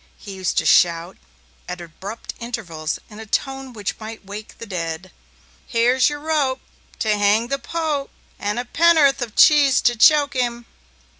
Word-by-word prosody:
He 200 Hz, -, -10 dB
used 185 Hz, -2 st, -3 dB
to -, -, +2 dB
shout, 170 Hz, +1 st, +3 dB, 0.5 s
at 180 Hz, -, -5 dB
abrupt 190 Hz, +6 st, -8 dB
intervals, 175 Hz, -10 st, -4 dB
in 210 Hz, -, -13 dB
a 220 Hz, -, -9 dB
tone 270 Hz, +3 st, -2 dB
which 210 Hz, -4 st, -5 dB
might 220 Hz, -1 st, -9 dB
wake 205 Hz, +2 st, -9 dB
the 230 Hz, -, -8 dB
dead: 175 Hz, -2 st, -5 dB, 0.6 s
Here's 245 Hz, +3 st, +3 dB
your 295 Hz, 0 st, -5 dB
rope.... 290 Hz, -4 st, 0 dB, 0.4 s
To 215 Hz, -2 st, +1 dB
hang 205 Hz, +3 st, +2 dB
the 275 Hz, 0 st, -1 dB
Pope.... 305 Hz, -2 st, -3 dB, 0.3 s
And 205 Hz, +2 st, -2 dB
a 245 Hz, -, -2 dB
penn'orth 310 Hz, -2 st, +4 dB
of 230 Hz, -3 st, -5 dB
cheese 290 Hz, -3 st, +6 dB
to 240 Hz, -, +2 dB
choke 285 Hz, +4 st, +5 dB
him. 240 Hz, -2 st, -2 dB
235 Hz, 160 wpm, -21 LUFS, 200-275 Hz, 0.6 s, cheese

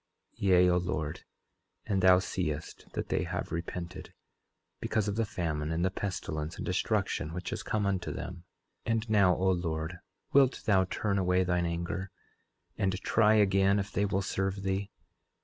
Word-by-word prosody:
11:15 -, -, -19 dB
Yea, 90 Hz, -2 st, +5 dB
O 90 Hz, -, +3 dB
Lord, 85 Hz, -3 st, -3 dB, 0.6 s
and 95 Hz, -2 st, 0 dB
thou 90 Hz, 0 st, +7 dB
seest 75 Hz, -4 st, -4 dB
that -, -, -3 dB
they -, -, +1 dB
have -, -, -4 dB
repented, 90 Hz, +2 st, -5 dB, 0.6 s
because 110 Hz, -2 st, 0 dB
of 100 Hz, -, -1 dB
the 115 Hz, -1 st, 0 dB
famine 80 Hz, -4 st, -2 dB
and 85 Hz, +2 st, +1 dB
the 95 Hz, -, +1 dB
pestilence 85 Hz, -6 st, -4 dB
and -, -, -5 dB
destruction 95 Hz, -4 st, -1 dB
which 90 Hz, -1 st, -4 dB
has -, -, -3 dB
come 105 Hz, -2 st, -1 dB
unto 95 Hz, -2 st, -1 dB
them. 90 Hz, -, -5 dB, 0.5 s
11:16 -, -, +1 dB
And 115 Hz, 0 st, -1 dB
now, 95 Hz, -4 st, +5 dB
O 95 Hz, +1 st, +2 dB
Lord, 85 Hz, -1 st, -2 dB, 0.3 s
wilt 135 Hz, -2 st, +4 dB
thou 95 Hz, -3 st, +4 dB
turn 100 Hz, +1 st, -1 dB
away 90 Hz, 0 st, +3 dB
thine 90 Hz, -1 st, +1 dB
anger, 85 Hz, +3 st, -3 dB, 0.7 s
and 95 Hz, -1 st, +1 dB
try 110 Hz, 0 st, +4 dB
again 100 Hz, -1 st, +4 dB
if 100 Hz, -1 st, -2 dB
they 100 Hz, -, +1 dB
will 100 Hz, -1 st, 0 dB
serve 95 Hz, 0 st, -2 dB
thee? 95 Hz, +1 st, -1 dB
95 Hz, 170 wpm, -30 LUFS, 85-100 Hz, 0.7 s, thou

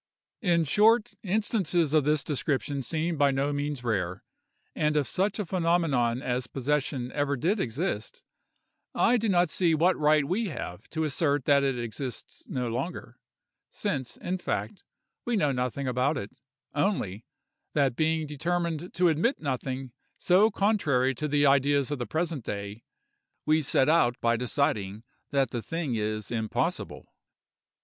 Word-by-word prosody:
In 170 Hz, -6 st, +3 dB
short, 215 Hz, -, +3 dB
instances 185 Hz, -, +1 dB
of 155 Hz, -3 st, +4 dB
this 150 Hz, 0 st, +2 dB
description 145 Hz, -1 st, -1 dB
seem 160 Hz, +4 st, -2 dB
by 145 Hz, -1 st, +5 dB
no 140 Hz, +2 st, 0 dB
means 145 Hz, -2 st, -3 dB
rare; 95 Hz, -5 st, -2 dB, 0.5 s
and 150 Hz, 0 st, +1 dB
if 145 Hz, -, +2 dB
such 195 Hz, +6 st, 0 dB
a 210 Hz, -, -2 dB
phenomenon 165 Hz, -9 st, +1 dB
as 125 Hz, -1 st, -1 dB
possession 135 Hz, -1 st, -1 dB
ever 145 Hz, -1 st, 0 dB
did 185 Hz, -, +1 dB
exist, 115 Hz, -, -3 dB, 0.7 s
I 245 Hz, -, +4 dB
do 225 Hz, -1 st, 0 dB
not 175 Hz, -3 st, +3 dB
see 170 Hz, -3 st, +2 dB
what 175 Hz, +4 st, +3 dB
right 150 Hz, -1 st, +3 dB
we 200 Hz, +9 st, -1 dB
have 100 Hz, -, -7 dB
to 160 Hz, -1 st, -2 dB
assert 145 Hz, -2 st, 0 dB
that 140 Hz, -1 st, +5 dB
it 135 Hz, -2 st, 0 dB
exists 120 Hz, +2 st, -6 dB
no 125 Hz, -2 st, -2 dB
longer, 130 Hz, +10 st, -5 dB, 0.5 s
since, 135 Hz, -, -3 dB
in 185 Hz, +1 st, -3 dB
fact, 195 Hz, +2 st, -3 dB, 0.4 s
we 240 Hz, -, -1 dB
know 150 Hz, -9 st, +2 dB
nothing 125 Hz, +1 st, -2 dB
about 130 Hz, +4 st, +1 dB
it; 115 Hz, +2 st, -7 dB, 0.3 s
only, 140 Hz, -, -1 dB, 0.5 s
that 140 Hz, -5 st, +2 dB
being 160 Hz, +1 st, +1 dB
determined 170 Hz, +3 st, -2 dB
to 180 Hz, 0 st, +4 dB
admit 170 Hz, -, +1 dB
nothing 130 Hz, -2 st, -3 dB, 0.3 s
so 190 Hz, +5 st, +4 dB
contrary 165 Hz, -, +2 dB
to 150 Hz, +5 st, -3 dB
the 145 Hz, 0 st, +2 dB
ideas 140 Hz, 0 st, +3 dB
of 145 Hz, -, -2 dB
the 120 Hz, -, -3 dB
present 160 Hz, -5 st, -2 dB
day, 100 Hz, +1 st, -5 dB, 0.6 s
we 155 Hz, +1 st, +3 dB
set 135 Hz, -2 st, +2 dB
out 135 Hz, -7 st, +3 dB
by 115 Hz, 0 st, +2 dB
deciding 115 Hz, -4 st, -1 dB, 0.3 s
that 135 Hz, -3 st, +1 dB
the 120 Hz, -, -3 dB
thing 165 Hz, -1 st, -3 dB
is 110 Hz, -1 st, -2 dB
impossible. 110 Hz, -2 st, -2 dB
145 Hz, 150 wpm, -28 LUFS, 125-170 Hz, 0.7 s, by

